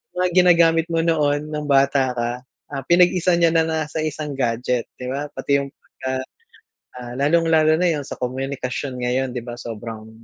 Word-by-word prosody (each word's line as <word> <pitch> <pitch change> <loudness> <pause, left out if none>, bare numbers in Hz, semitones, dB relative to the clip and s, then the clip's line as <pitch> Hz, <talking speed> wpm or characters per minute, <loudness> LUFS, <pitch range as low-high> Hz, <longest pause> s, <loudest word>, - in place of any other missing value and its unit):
mga 180 0 +1
ginagamit 170 -2 +4
mo 165 -1 0
noon 150 -2 +1
ng 150 -1 -4
bata 135 -2 +3
ka, 120 0 -1 0.4
ah, 135 -1 -4
pinag-isa 180 0 +4
niya 170 -1 +3
na 165 -1 +2
nasa 160 -1 -2
isang 155 -1 -3
gadget 120 0 0
'di 125 0 -6
ba 145 +2 -3
pati 140 0 +1
yung, 140 - -4
pag, 140 - -23 0.2
ah, 130 0 -1 0.8
ah, 120 -1 -8
lalong 155 +5 +2
lalo 155 0 +4
na 180 - +2
yung 145 - -3
sa - - -8
komunikasyon 130 0 -4
ngayon 130 +1 0
'di 125 -1 -6
ba? 120 - -5
Sobrang 110 -1 -8
145 Hz, 180 wpm, -21 LUFS, 125-165 Hz, 0.8 s, ginagamit